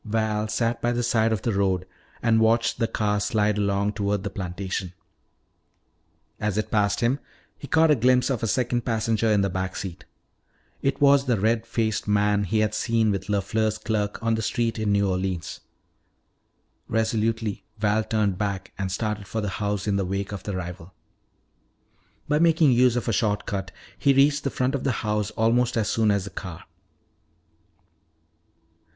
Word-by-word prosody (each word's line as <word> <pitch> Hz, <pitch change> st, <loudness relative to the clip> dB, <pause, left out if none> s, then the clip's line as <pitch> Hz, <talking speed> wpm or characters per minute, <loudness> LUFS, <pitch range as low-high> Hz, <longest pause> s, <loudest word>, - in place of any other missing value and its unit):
Val 110 Hz, -1 st, -1 dB
sat 115 Hz, +2 st, -1 dB
by 120 Hz, -, +1 dB
the 120 Hz, 0 st, -1 dB
side 115 Hz, -1 st, +2 dB
of 110 Hz, -4 st, -1 dB
the 115 Hz, -, 0 dB
road 95 Hz, -2 st, +1 dB, 0.4 s
and 115 Hz, -1 st, +4 dB
watched 115 Hz, +1 st, +2 dB
the 115 Hz, -, +2 dB
car 105 Hz, -2 st, 0 dB
slide 105 Hz, -1 st, +1 dB
along 100 Hz, 0 st, 0 dB
toward 100 Hz, -1 st, -1 dB
the 100 Hz, -, -4 dB
plantation. 95 Hz, -1 st, -4 dB, 1.5 s
As 105 Hz, -1 st, -1 dB
it 110 Hz, -, -2 dB
passed 105 Hz, 0 st, +1 dB
him 125 Hz, +4 st, +1 dB, 0.4 s
he 140 Hz, -, -10 dB
caught 160 Hz, +1 st, +4 dB
a -, -, +6 dB
glimpse 125 Hz, +1 st, +3 dB
of 125 Hz, -, -1 dB
a 115 Hz, -, 0 dB
second 120 Hz, +1 st, 0 dB
passenger 115 Hz, -1 st, 0 dB
in 105 Hz, -2 st, +3 dB
the 100 Hz, -, +2 dB
back 95 Hz, +1 st, -3 dB
seat. 95 Hz, -3 st, -6 dB, 0.8 s
It 135 Hz, 0 st, 0 dB
was 140 Hz, -1 st, +5 dB
the 120 Hz, -5 st, +1 dB
red 110 Hz, +2 st, +1 dB
faced 110 Hz, -2 st, -1 dB
man 105 Hz, 0 st, +2 dB
he 110 Hz, +4 st, +1 dB
had 105 Hz, -1 st, 0 dB
seen 115 Hz, -1 st, +1 dB
with 100 Hz, -1 st, -3 dB
LeFleur's 110 Hz, +2 st, 0 dB
clerk 105 Hz, -3 st, -2 dB
on 115 Hz, 0 st, +2 dB
the 110 Hz, -, 0 dB
street 115 Hz, +1 st, -1 dB
in 105 Hz, -2 st, 0 dB
New 100 Hz, 0 st, +2 dB
Orleans. 95 Hz, -2 st, -2 dB, 1.3 s
Resolutely 110 Hz, -1 st, -1 dB
Val 105 Hz, +1 st, +1 dB
turned 105 Hz, -4 st, 0 dB
back 100 Hz, -2 st, -3 dB
and 95 Hz, -1 st, -2 dB
started 105 Hz, 0 st, -3 dB
for 110 Hz, -, -3 dB
the 105 Hz, -2 st, -2 dB
house 100 Hz, -1 st, -1 dB
in 100 Hz, -2 st, +1 dB
the 100 Hz, -, 0 dB
wake 100 Hz, +2 st, -3 dB
of 100 Hz, -2 st, -5 dB
the 100 Hz, -1 st, -4 dB
rival. 90 Hz, 0 st, -7 dB, 1.3 s
By 150 Hz, 0 st, +2 dB
making 160 Hz, -3 st, +4 dB
use 125 Hz, 0 st, +4 dB
of 120 Hz, -, -2 dB
a 115 Hz, -, +1 dB
short 105 Hz, -1 st, 0 dB
cut, 95 Hz, -2 st, -3 dB, 0.3 s
he 140 Hz, -, +4 dB
reached 140 Hz, +2 st, +3 dB
the -, -, +2 dB
front 130 Hz, +1 st, -1 dB
of 140 Hz, -, -2 dB
the 135 Hz, -, +1 dB
house 105 Hz, -1 st, 0 dB
almost 120 Hz, +2 st, +2 dB
as 110 Hz, -2 st, 0 dB
soon 110 Hz, -2 st, +2 dB
as 100 Hz, -2 st, +2 dB
the 100 Hz, -, -8 dB
car. 90 Hz, -2 st, -7 dB
110 Hz, 180 wpm, -25 LUFS, 100-115 Hz, 1.5 s, a